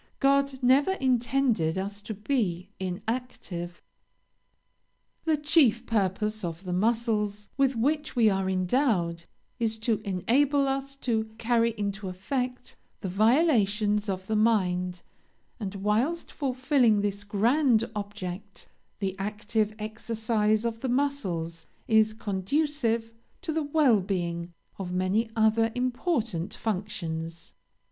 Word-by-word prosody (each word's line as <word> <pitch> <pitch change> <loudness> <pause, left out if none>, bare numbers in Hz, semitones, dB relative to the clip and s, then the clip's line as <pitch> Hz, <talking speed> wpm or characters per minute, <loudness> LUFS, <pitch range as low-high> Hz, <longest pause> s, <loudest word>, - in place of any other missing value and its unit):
God 275 -1 +2
never 275 +8 +4
intended 245 - +1
us 200 +2 -4
to 215 +1 -6
be 200 -5 -1
inactive. 190 -3 -4 1.4
"The 315 -2 +3
chief 290 -6 +3
purpose 215 0 0
of 170 +1 -4
the 180 -2 -3
muscles 210 0 0
with 270 -1 +2
which 295 +7 0
we 235 -3 +5
are 195 -2 +1
endowed, 185 -3 +1 0.3
is 225 -1 +1
to 225 -2 0
enable 265 +10 +2
us 275 0 -2
to 225 -3 +1
carry 230 0 +2
into 200 -1 -3
effect 250 +7 -3 0.3
the 195 - -3
volitions 210 - +3
of 190 -1 -3
the 220 - -1
mind; 180 -5 +1 0.6
and, 200 -3 -4
whilst 220 - 0
fulfilling 255 -5 +2
this 205 0 -2
grand 230 +4 +2
object, 200 -1 -6 0.3
the 195 -2 -2
active 210 +1 -1
exercise 220 0 0
of 230 -1 -2
the 260 - -2
muscles 195 -12 -1 0.2
is 220 -1 +4
conducive 230 +3 -1 0.3
to 325 -4 -2
the 320 - 0
well 285 -6 +4
being 175 -3 -3 0.3
of 180 -2 -4
many 185 +5 +1
other 225 0 +3
important 245 - -1
functions. 170 -6 -4
220 Hz, 115 wpm, -27 LUFS, 195-250 Hz, 1.4 s, we